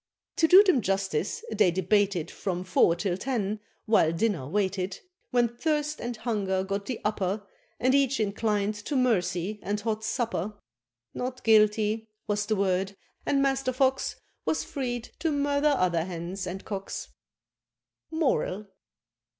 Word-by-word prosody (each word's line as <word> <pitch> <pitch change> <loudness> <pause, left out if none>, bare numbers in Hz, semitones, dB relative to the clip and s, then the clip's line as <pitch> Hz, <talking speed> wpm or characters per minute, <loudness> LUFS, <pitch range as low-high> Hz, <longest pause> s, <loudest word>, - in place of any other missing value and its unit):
To 320 - +5
do 375 +4 +9
them 365 - +3
justice, 195 -3 -1
they 215 -4 +4
debated 190 -1 +1
From 180 -2 -3
four 185 -2 +4
till 175 0 -1
ten, 215 -3 -2 0.3
while 190 -7 +4
dinner 165 -5 0
waited, 190 +1 -1 0.3
When 245 -2 +3
thirst 300 +5 -1
and 240 -1 -4
hunger 205 -5 -1
got 200 +1 -3
the 255 - -3
upper, 205 -1 -1 0.3
And 255 +2 +3
each 275 -1 +3
inclin'd 210 0 0
to 295 - -2
mercy, 210 -5 +1
and 205 +1 -2
hot 220 0 -2
supper: 215 -4 -2 0.6
"Not 255 0 -4
Guilty" 215 0 +3 0.2
was 205 0 -1
the 215 - +2
word, 195 0 0 0.3
and 275 -1 +3
Master 270 -1 +1
Fox 265 +1 +1 0.3
Was 315 - 0
freed 245 -4 -4
to 325 - 0
murder 285 0 +2
other 175 -3 +2
hens 180 +2 -5
and 185 +2 -6
cocks. 195 -2 -5 1.0
MORAL. 265 - 0
210 Hz, 140 wpm, -28 LUFS, 190-255 Hz, 1.0 s, do